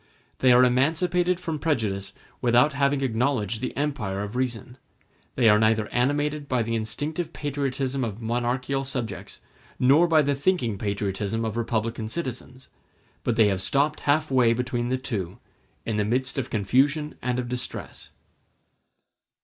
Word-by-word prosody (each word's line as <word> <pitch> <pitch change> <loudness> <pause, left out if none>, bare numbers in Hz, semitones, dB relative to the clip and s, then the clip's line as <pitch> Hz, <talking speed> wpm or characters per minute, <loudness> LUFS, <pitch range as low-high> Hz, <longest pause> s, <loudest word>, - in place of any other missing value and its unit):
They 130 - +5
are 125 +1 +7
emancipated 165 +8 +2
from 165 -4 -4
prejudice 105 -11 -1 0.3
without 125 +5 +4
having 140 0 +1
acknowledged 120 -3 0
the 130 - -4
empire 105 -10 -2
of 105 +3 -7
reason; 125 0 -3 0.6
they 120 -3 +3
are 105 -1 +6
neither 110 -1 +2
animated 145 +3 0
by 125 -3 +1
the 115 +1 -3
instinctive 145 +9 -3
patriotism 135 -2 -2
of 110 -2 -4
monarchical 125 +4 -1
subjects 130 -4 -5 0.4
nor 140 +7 +5
by 160 -2 +4
the 145 0 +1
thinking 135 - 0
patriotism 100 +2 -2
of 110 -1 -3
republican 115 -1 -2
citizens; 130 -3 -5 0.6
but 120 - 0
they 110 -2 +5
have 95 -2 -1
stopped 140 +8 +1
halfway 135 -5 +3
between 120 0 -2
the 130 - +1
two, 105 -9 -4 0.5
in 110 -2 -1
the 105 - +2
midst 130 +6 0
of 125 - -3
confusion 140 +9 +1
and 125 -1 -1
of 125 -1 -2
distress. 125 +1 -6
125 Hz, 145 wpm, -25 LUFS, 115-140 Hz, 0.6 s, are